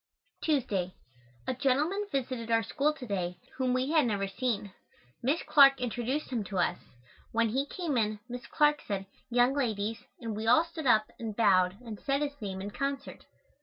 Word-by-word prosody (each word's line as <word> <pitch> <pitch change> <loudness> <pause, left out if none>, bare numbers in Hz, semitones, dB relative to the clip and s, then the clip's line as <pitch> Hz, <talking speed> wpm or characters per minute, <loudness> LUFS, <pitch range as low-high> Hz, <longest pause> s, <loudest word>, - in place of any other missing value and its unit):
Tuesday. 210 - 0 0.5
A - - -1
gentleman 295 +10 +1
visited 255 -4 -2
our 225 0 +3
school 285 +7 +1
to 275 -4 -9
day 180 -5 -2 0.2
whom 260 -1 +1
we 255 +3 0
had 310 -6 +4
never 200 -3 0
seen. 205 -2 -2 0.5
Miss 280 +7 +1
Clark 275 -2 +7
introduced 250 +4 -2
him 235 -4 -1
to 195 0 -5
us. 180 0 +1 0.5
When 230 0 +2
he 270 +5 0
came 330 -3 -3
in, 215 -2 0
Miss 245 0 -7
Clark 295 0 +3
said, 195 -1 -2 0.2
"Young 245 +2 +4
ladies," 225 -5 -1 0.2
and 225 -3 -4
we 220 +1 -3
all 315 +8 +6
stood 330 -4 -5
up 215 -3 +4
and 220 -3 -4
bowed 185 -4 +4
and 220 -3 -7
said 275 +1 0
his 285 -2 -5
name 190 -2 -4
in 205 - -5
concert. 275 +3 -4
245 Hz, 180 wpm, -30 LUFS, 210-280 Hz, 0.5 s, Clark